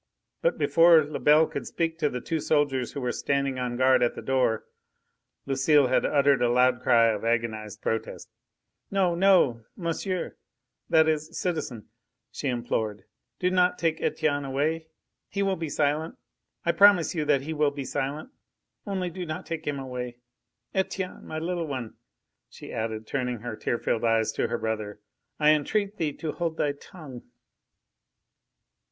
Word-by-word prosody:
But - - +1
before 165 -1 +6
Lebel 150 +1 +4
could - - -6
speak 165 -1 -2
to 150 -3 +2
the 125 -2 -5
two 160 +5 -2
soldiers 145 -5 0
who 140 - -4
were 125 -1 -1
standing 140 -1 -1
on 125 -1 -2
guard 130 +1 +4
at 120 - +1
the - - -7
door, 130 -4 +1 0.8
Lucile 135 0 +3
had 130 - +2
uttered 140 -3 +3
a 120 - +3
loud 125 0 +3
cry 115 -2 +5
of 105 -2 -2
agonised 110 -2 -2
protest. 110 0 -3 0.6
"No! 190 -3 +2
no! 170 - +4
monsieur! 180 +1 -3 0.5
that 160 0 +5
is 155 +1 -1
citizen!" 155 - -3 0.4
she - - -4
implored. 110 -5 -2 0.3
"Do 180 0 0
not 180 0 +3
take 165 -1 0
Etienne 145 -2 0
away. 150 +4 -1 0.4
He 200 - -1
will 195 -1 +1
be 165 -3 -4
silent.... 150 +3 0 0.5
I 170 - +4
promise 200 -3 +5
you 160 -4 -1
that 145 -2 +3
he 155 +4 -4
will 150 -1 +2
be 140 -1 -6
silent... 145 - -3 0.6
only 185 -3 -2
do 180 +2 -5
not 155 -2 -5
take 165 -2 -5
him 145 -1 -1
away! 125 -2 -5 0.6
Etienne, 190 -1 -3
my 155 - -5
little 170 +1 -2
one!" 130 -6 -5 0.6
she - - -11
added, 110 0 -3
turning 125 -2 -3
her 120 -1 -5
tear 120 - -1
filled 115 - -1
eyes 115 -1 +2
to - - -1
her - - -2
brother, 110 -2 -4 0.4
"I 150 0 +6
entreat 200 +7 0
thee 150 -3 -1
to 160 0 -4
hold 165 -1 -3
thy 145 - +1
tongue!" 140 -4 -11
145 Hz, 160 wpm, -27 LUFS, 125-165 Hz, 0.8 s, before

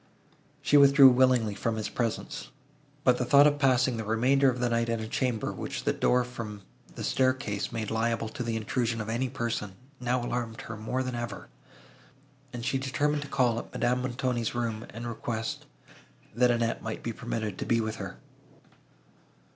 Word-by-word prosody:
She 145 - +5
withdrew 140 -1 +8
willingly 125 -4 +3
from 110 +3 -2
his 110 -2 -3
presence; 115 0 -3 0.5
but 125 -2 +4
the - - +1
thought 140 +3 +6
of 145 -1 +3
passing 130 -3 +3
the 110 - -3
remainder 130 +6 +3
of 125 -1 -2
the 125 - +1
night 115 0 0
in 115 -1 0
a 110 - -4
chamber, 120 -1 -1
which - - -5
the - - +1
door 125 0 +2
from 110 -5 -7 0.3
the - - -6
staircase 130 -6 0
made 110 -2 -3
liable 115 0 0
to 115 - -7
the 115 -2 -2
intrusion 115 +1 -1
of 110 0 -4
any 125 +3 -1
person, 115 -6 -3 0.3
now 125 0 0
alarmed 120 -2 -3
her 115 - -7
more 110 +4 -2
than 130 -1 -4
ever, 110 -7 -5 1.0
and 120 -2 -6
she 135 0 0
determined 145 +3 0
to 145 - -6
call 125 -4 +1
at - - -10
Madame 125 +1 +1
Montoni's 125 -2 -2
room, 115 -2 -2
and 115 +2 -7
request, 110 -1 -4 0.7
that 125 +2 +3
Annette 115 -1 0
might 110 -1 -5
be 115 - -3
permitted 110 -5 -4
to - - -3
be 115 - +3
with 110 0 -2
her. 95 -2 -7
120 Hz, 180 wpm, -28 LUFS, 110-130 Hz, 1.0 s, withdrew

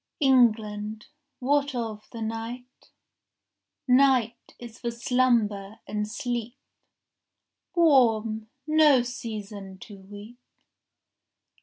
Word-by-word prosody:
14 270 -3 +4
England, 215 -2 +1 0.3
what 285 +1 0
of 220 -3 -5
the 230 -2 -6
night?— 230 +3 -7 1.0
Night 250 -3 +2
is 235 -1 -11
for 240 - -3
slumber 235 -4 0
and 210 0 -3
sleep, 240 +1 -4 1.2
Warm, 225 -9 +3 0.2
no 305 -4 +5
season 210 -5 -7
to 200 +1 -12
weep. 205 +5 -12
230 Hz, 90 wpm, -26 LUFS, 215-250 Hz, 1.2 s, no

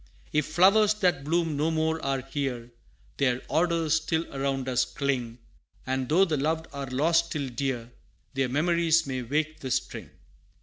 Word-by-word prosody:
If 150 -2 +1
flowers 200 +6 +5
that 180 -9 +1
bloom 165 +1 0
no 150 +3 +1
more 160 0 0
are 135 -1 0
here, 130 -3 -4 0.5
Their 125 -2 +1
odors 165 -1 +2
still 160 +1 -1
around 135 -1 -1
us 125 -1 +2
cling 125 -3 -2 0.5
And 130 -1 -2
though 180 +6 +5
the 160 -5 -1
loved 160 +3 -1
are 140 -1 -5
lost 160 +6 +2
still 145 -5 -3
dear, 125 -1 -3 0.4
Their 135 -2 0
memories 165 +3 +2
may 130 -2 -3
wake 155 +6 -2
the 130 - -5
string. - - -3
145 Hz, 160 wpm, -27 LUFS, 130-165 Hz, 0.5 s, flowers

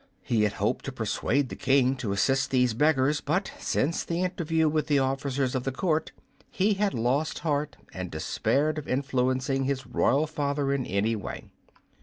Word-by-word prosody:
He 115 -4 +2
had 105 - 0
hoped - - -1
to - - -3
persuade 135 +2 0
the - - -6
King 135 -1 +3
to 110 -5 -3
assist 135 +8 +1
these 125 -3 +2
beggars, 145 +2 +2
but 180 +7 -1
since 160 +5 0
the 170 +2 -1
interview 165 -3 +1
with 155 0 0
the 145 - +3
officers 135 -1 0
of 130 -2 -1
the 135 - -1
court 160 +3 0 0.4
he 205 +3 +2
had 200 -3 0
lost 130 +7 0
heart 150 -1 -1 0.2
and 90 -1 -5
despaired 145 - 0
of 150 - -9
influencing 130 0 0
his 135 -1 -2
royal 135 +4 +2
father 145 -2 -1
in 135 -3 -2
any 105 +4 +1
way. 105 - -7
135 Hz, 175 wpm, -27 LUFS, 125-155 Hz, 0.4 s, King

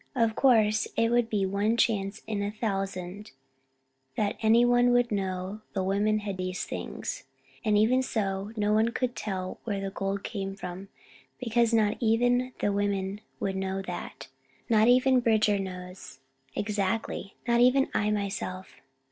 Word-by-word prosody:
Of 230 -3 +2
course, 215 -5 +4
it 230 0 +3
would 240 -1 +2
be 205 -3 +1
one 200 +4 +1
chance 210 -3 0
in 215 -2 -2
a 200 - -1
thousand 195 -2 -4 0.9
that 205 -1 0
any 230 +2 +5
one 245 0 +4
would 245 -1 +3
know 190 +1 -3
the 190 - -1
women 205 +3 +1
had 200 -2 -4
these 185 0 -3
things, - - -5 0.4
and 210 -2 +3
even 235 +5 +4
so 200 -4 -2
no 210 0 +2
one 220 +2 +3
could 250 -1 -1
tell 185 -3 -4
where 205 -4 -2
the 195 0 -4
gold 195 0 -3
came 195 -2 -4
from, 185 0 -7 0.5
because 235 -1 +1
not 215 -2 +2
even 245 +2 +2
the 205 - +2
women 200 0 -1 0.2
would 195 -1 -2
know 190 0 -2
that; - - -7 0.4
not 220 -1 +4
even 255 +1 +5
Bridger 215 -3 +3
does, 180 -6 -7 0.4
exactly; 205 -1 -2
not 235 0 +3
even 260 +2 +5
I 210 0 +1
myself. 200 -2 -3
210 Hz, 155 wpm, -28 LUFS, 195-230 Hz, 0.9 s, any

